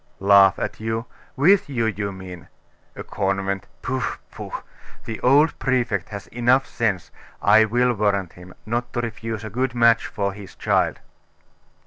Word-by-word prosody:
'Laugh 100 -1 +6
at - - -4
you? 115 +1 -2 0.3
with 170 +5 +4
you, 120 -5 0
you 100 -2 -2
mean. 90 -4 -10 0.5
A - - -7
convent? 95 -1 -2 0.2
Pooh, 130 0 -2 0.3
pooh! - - -8 0.5
The 115 - -5
old 145 +5 +4
Prefect 120 -8 0
has 100 -2 -7
enough 125 +3 +2
sense, 110 -6 -2 0.3
I 110 +2 +5
will 120 +3 +2
warrant 100 -4 0
him, 90 +1 -14
not 120 +2 -2
to 120 - -1
refuse 115 -2 -5
a 110 - -6
good 125 +2 -1
match 115 -1 +4
for 100 -2 -2
his 100 -1 -11
child. - - +1
110 Hz, 150 wpm, -22 LUFS, 100-120 Hz, 0.5 s, Laugh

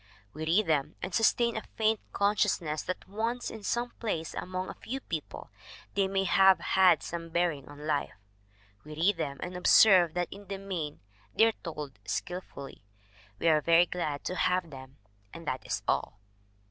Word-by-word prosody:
We 155 +1 -5
read 195 +6 +3
them 150 -1 0
and 180 - -4
sustain 235 +1 +3
a 220 - -2
faint 220 -1 +2
consciousness 200 -6 +1
that 185 - -5
once 230 +5 -2
in 220 - -8
some 240 +4 -1
place 165 -8 -3
among 185 0 -4
a - - -6
few 265 +4 -6
people 160 - -6 0.4
they 195 -1 +2
may 195 0 0
have 190 0 +5
had 185 -7 +4
some 165 0 -5
bearing 165 -5 -1
on 145 +1 -10
life. 150 -2 -1 0.7
We 150 - -9
read 180 +6 +2
them 140 -1 -3
and 180 +1 -6
observe 180 -2 +6
that 175 -1 -2
in 200 0 -13
the 195 - -4
main 180 -7 -5 0.3
they 225 - +6
are 225 - +3
told 150 - -8
skillfully. 140 - -6 0.5
We 165 - -1
are 155 -2 +5
very 170 +3 +5
glad 155 -5 -3
to 185 - -3
have 180 -2 0
them 130 0 -11 0.4
and 165 -2 -10
that 130 - -2
is - - -2
all. - - 0
180 Hz, 175 wpm, -29 LUFS, 155-200 Hz, 0.7 s, observe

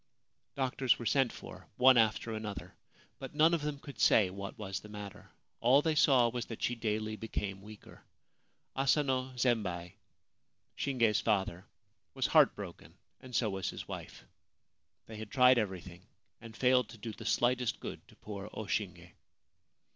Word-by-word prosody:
Doctors 130 -1 +1
were 120 - -7
sent 135 0 +2
for, - - -11
one 130 +1 +7
after 110 0 +2
another; 110 -2 -6 0.5
but 135 +2 -8
none 160 +3 +5
of 165 - +1
them 150 -1 -3
could 140 -1 -11
say 100 -5 +5
what 100 +1 -7
was 95 -3 -4
the 105 - -13
matter. 105 -1 -9 0.3
All 130 +5 +5
they 160 - +2
saw 135 -5 +5
was 120 0 -4
that 115 - -7
she 120 - +1
daily 110 -2 -2
became 100 -3 -4
weaker. 105 +1 -13 0.7
Asano 135 -1 +1
Zembei, 95 -8 0 0.8
Shinge's 115 -6 +1
father, 95 -4 -1 0.5
was - - 0
heartbroken, - - +1 0.2
and 130 -2 -9
so 110 -4 +1
was 95 -1 -3
his - - -7
wife. - - -8 0.8
They 110 - -9
had 110 -1 -7
tried 125 +1 +5
everything 95 -3 -5 0.3
and 115 0 -11
failed 125 -3 +3
to 115 - -11
do 110 +1 -6
the - - -10
slightest 125 0 +1
good - - -8
to - - -19
poor 100 -1 -8
O 110 - -4
Shinge. 90 -4 -3
115 Hz, 155 wpm, -32 LUFS, 105-130 Hz, 0.8 s, one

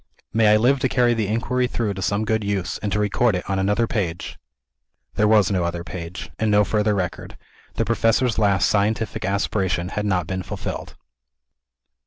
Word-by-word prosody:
May 110 0 +4
I 105 - +6
live 130 +5 +3
to 130 0 +1
carry 120 -2 +3
the 110 -3 -1
inquiry 125 +4 0
through 115 -4 -2
to 95 - -6
some 100 +4 0
good 110 0 0
use, 100 -3 -2
and 105 - -3
to 100 - +1
record 105 +1 +2
it 90 - -4
on 95 -1 -1
another 105 +4 +1
page!" 90 -6 -3 0.7
There 105 - +2
was 105 -3 +4
no 95 -3 +1
other 85 0 -3
page, 85 0 -7
and 110 - +1
no 105 0 +5
further 105 0 +1
record. 90 -3 -4 0.4
The 115 - 0
Professor's 115 +2 +1
last 100 -4 +3
scientific 105 +2 0
aspiration 95 -2 -1
had 105 +1 -2
not 90 -4 +1
been 95 +2 -3
fulfilled. - - -6
105 Hz, 185 wpm, -22 LUFS, 95-110 Hz, 0.7 s, I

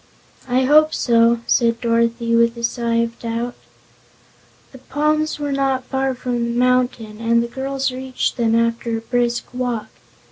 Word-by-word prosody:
"I 255 +1 +2
hope 310 +3 +4
so," 230 -1 +3
said 235 -2 +2
Dorothy 230 0 +1
with 235 0 +3
a 235 - -7
sigh 235 0 -1
of 230 0 -6
doubt 235 +1 -3 1.2
The 265 - -13
palms 305 +4 0
were 290 -1 -3
not 270 -1 0
far 265 0 -1
from 245 -1 -2
the 235 0 -2
mountain 245 -4 0
and 235 0 +2
the - - -4
girls 270 +2 -2
reached 260 0 -3
them 230 -2 +1
after 230 0 0
a - - -6
brisk 240 0 -1
walk. 245 -4 -3
240 Hz, 155 wpm, -20 LUFS, 230-260 Hz, 1.2 s, hope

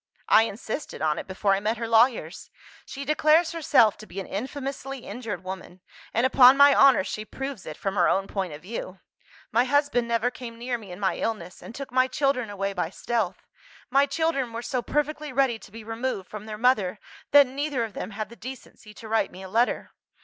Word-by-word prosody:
"I 225 - +6
insisted 225 +6 -6
on 155 -1 +1
it, - - -8
before 195 +1 +1
I 195 - +1
met 215 +3 -1
her 230 0 -3
lawyers. 225 -7 +2 0.4
She 280 0 -6
declares 310 +3 +3
herself 260 -10 +3
to 215 - -12
be 190 - -7
an 190 - -5
infamously 270 +3 -5
injured 215 -7 -6
woman 185 -1 -8 0.3
and, 235 +3 +1
upon 260 0 +7
my 285 0 +8
honour, 270 -7 +6
she 215 - -5
proves 270 0 -7
it, 155 - -7
from 195 - -2
her 180 -3 +3
own 195 0 +1
point 195 -3 -3
of 150 +2 -10
view. 190 -2 -6 0.5
'My 235 +3 +3
husband 285 -3 +1
never 235 +1 +1
came 235 -2 -9
near 240 0 -3
me 205 -4 -11
in 180 - -8
my 195 -2 0
illness, 180 -6 -4
and 230 - -10
took 275 -2 -7
my 255 +1 +3
children 260 -4 0
away 200 -1 -3
by 180 -4 -2
stealth. 205 -1 -2 0.5
My 275 +2 +4
children 280 -5 -1
were 230 +1 -5
so 255 -1 -2
perfectly 295 +3 -2
ready 260 -3 +1
to 195 - -15
be 225 +1 -10
removed 225 -3 -3
from 210 0 -9
their 215 -1 -6
mother, 215 -5 +2 0.3
that 285 -1 +8
neither 275 -1 -2
of 220 -3 -5
them - - -5
had 215 0 -5
the 235 - -12
decency 235 -3 -11
to 225 - -10
write 225 +1 +1
me 190 - -10
a - - -7
letter. 230 +5 0
230 Hz, 210 wpm, -26 LUFS, 200-270 Hz, 0.5 s, my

